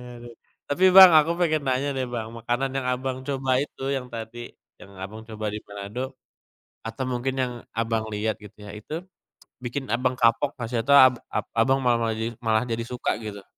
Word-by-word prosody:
aduh 120 Hz, 0 st, -11 dB, 0.3 s
tapi 180 Hz, +6 st, +1 dB
Bang, 190 Hz, -1 st, +10 dB
aku 155 Hz, +1 st, +5 dB
pengen 155 Hz, -3 st, +1 dB
nanya 130 Hz, +2 st, +1 dB
deh 130 Hz, -1 st, -2 dB
Bang, 115 Hz, -2 st, -4 dB
makanan 120 Hz, +3 st, -2 dB
yang 135 Hz, -1 st, -2 dB
Abang, 130 Hz, +1 st, -2 dB
coba 135 Hz, -1 st, -2 dB
itu 145 Hz, -, -7 dB
yang 130 Hz, -2 st, -3 dB
tadi 120 Hz, +1 st, -7 dB, 0.3 s
yang 100 Hz, -, -13 dB
Abang, 100 Hz, +4 st, -7 dB
coba 110 Hz, 0 st, -6 dB
di 105 Hz, -, -4 dB
Manado, 105 Hz, +6 st, -6 dB, 0.7 s
atau 115 Hz, +4 st, -5 dB
mungkin 130 Hz, +1 st, -2 dB
yang 125 Hz, -1 st, -1 dB, 0.2 s
Abang, 115 Hz, -1 st, -1 dB
lihat 105 Hz, +1 st, -1 dB
gitu 105 Hz, -, -14 dB
ya 105 Hz, -1 st, -9 dB
itu 150 Hz, +10 st, -6 dB, 0.6 s
bikin 130 Hz, +2 st, -4 dB
Abang, 125 Hz, +1 st, 0 dB
kapok 115 Hz, +4 st, +3 dB
atau -, -, -17 dB
gak -, -, -8 dB
sih -, -, +2 dB
atau 140 Hz, +4 st, +5 dB
ab 130 Hz, -2 st, +8 dB, 0.2 s
ab -, -, -2 dB
Abang, 130 Hz, +4 st, +3 dB
malah 120 Hz, -1 st, +3 dB
malah 115 Hz, -1 st, 0 dB
jadi 115 Hz, +1 st, -2 dB
malah 110 Hz, -1 st, +2 dB
jadi 115 Hz, -1 st, -2 dB
suka 125 Hz, 0 st, -2 dB
gitu? 100 Hz, -2 st, -7 dB
120 Hz, 200 wpm, -25 LUFS, 110-135 Hz, 0.7 s, Bang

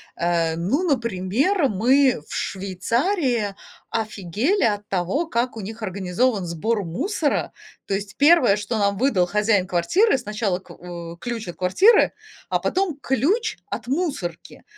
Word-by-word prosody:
Э, 170 Hz, -1 st, 0 dB
ну, 205 Hz, -, 0 dB
например, 255 Hz, -, +1 dB
мы 250 Hz, -, +3 dB
в -, -, -9 dB
Швейцарии 230 Hz, -, -1 dB, 0.3 s
офигели 220 Hz, -, -1 dB
от 205 Hz, -2 st, 0 dB
того, 195 Hz, -, -1 dB
как 240 Hz, -4 st, -1 dB
у -, -, -4 dB
них 220 Hz, +4 st, -8 dB
организован 195 Hz, +2 st, 0 dB
сбор 200 Hz, +6 st, -1 dB
мусора. 290 Hz, -, -1 dB, 0.3 s
То 195 Hz, -, -3 dB
есть 200 Hz, +1 st, -4 dB
1, 285 Hz, -9 st, +5 dB
что 210 Hz, +2 st, -3 dB
нам 200 Hz, -1 st, +1 dB
выдал 205 Hz, -7 st, +2 dB
хозяин 210 Hz, -1 st, +2 dB
квартиры- 195 Hz, -, +2 dB
сначала 210 Hz, -6 st, -2 dB
к -, -, -17 dB
у 170 Hz, -1 st, -9 dB
ключ 235 Hz, +2 st, -5 dB
от 175 Hz, -, -6 dB
квартиры, 190 Hz, -, +4 dB, 0.4 s
а -, -, +1 dB
потом 370 Hz, -5 st, -1 dB
ключ 385 Hz, -, 0 dB
от 245 Hz, -, -5 dB
мусорки, 270 Hz, -, -3 dB
215 Hz, 140 wpm, -23 LUFS, 185-275 Hz, 0.4 s, 1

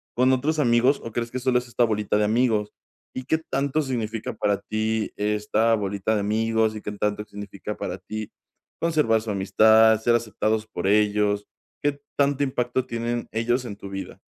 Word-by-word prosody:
con 125 Hz, +2 st, +4 dB
otros 145 Hz, +5 st, +1 dB
amigos, 125 Hz, +1 st, +3 dB
o 115 Hz, -, -6 dB
crees 115 Hz, +1 st, -3 dB
que 130 Hz, -, -3 dB
solo 130 Hz, 0 st, +2 dB
es 125 Hz, -, -10 dB
esta 120 Hz, 0 st, +1 dB
bolita 105 Hz, -3 st, 0 dB
de 105 Hz, -, +2 dB
amigos? 110 Hz, -1 st, +1 dB, 0.4 s
¿Y 130 Hz, -, -4 dB
qué 160 Hz, -, +2 dB
tanto 140 Hz, -1 st, -1 dB
significa 115 Hz, -6 st, -3 dB
para 105 Hz, -2 st, 0 dB
ti 110 Hz, 0 st, -1 dB
esta 105 Hz, +2 st, +1 dB
bolita 100 Hz, 0 st, -1 dB
de 105 Hz, -, 0 dB
amigos, 110 Hz, +1 st, +1 dB
y 105 Hz, -, -6 dB
qué 105 Hz, -, -5 dB
tanto 105 Hz, 0 st, -2 dB
significa 105 Hz, 0 st, -7 dB
para 90 Hz, -, -4 dB
ti 110 Hz, +3 st, -6 dB, 0.5 s
conservar 150 Hz, -10 st, +2 dB
su 110 Hz, -1 st, -4 dB
amistad, 110 Hz, +3 st, +5 dB
ser 120 Hz, +1 st, +3 dB
aceptados 110 Hz, -1 st, -1 dB
por 90 Hz, -4 st, -4 dB
ellos? 105 Hz, 0 st, +2 dB, 0.3 s
¿Qué 145 Hz, -1 st, 0 dB, 0.2 s
tanto 140 Hz, 0 st, +2 dB
impacto 125 Hz, -1 st, -1 dB
tienen 120 Hz, 0 st, -3 dB
ellos 120 Hz, +3 st, 0 dB
en 105 Hz, -4 st, -6 dB
tu 100 Hz, -1 st, -9 dB
vida? 95 Hz, 0 st, -7 dB
110 Hz, 180 wpm, -24 LUFS, 105-125 Hz, 0.5 s, amistad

